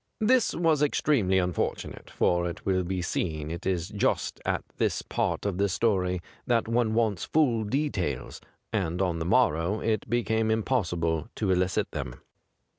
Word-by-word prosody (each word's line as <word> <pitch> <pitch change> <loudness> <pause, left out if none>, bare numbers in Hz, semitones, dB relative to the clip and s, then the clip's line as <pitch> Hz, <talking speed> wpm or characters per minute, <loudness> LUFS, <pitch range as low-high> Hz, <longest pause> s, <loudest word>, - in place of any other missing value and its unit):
This 240 +2 +3
was 165 -4 +2
extremely 135 -9 +2
unfortunate, 90 -2 -2
for 85 0 +1
it 85 - -9
will 95 -1 +2
be 90 0 -2
seen 80 -3 -2
it 85 +3 -5
is 90 -1 -1
just 105 -1 -1
at - - 0
this - - 0
part - - -1
of 100 -2 -1
the 100 0 +2
story 90 -3 +1 0.3
that 115 -2 +2
one 115 -1 +1
wants 110 -5 +1
full 125 -8 +2
details, 105 - -2 0.3
and 90 -5 -1
on 90 -4 0
the 80 - -2
morrow 95 -2 +2
it 110 -2 -1
became 110 -2 +1
impossible 90 -8 0
to 100 -4 0
elicit 90 0 +1
them. - - -5
95 Hz, 155 wpm, -27 LUFS, 90-115 Hz, 0.3 s, This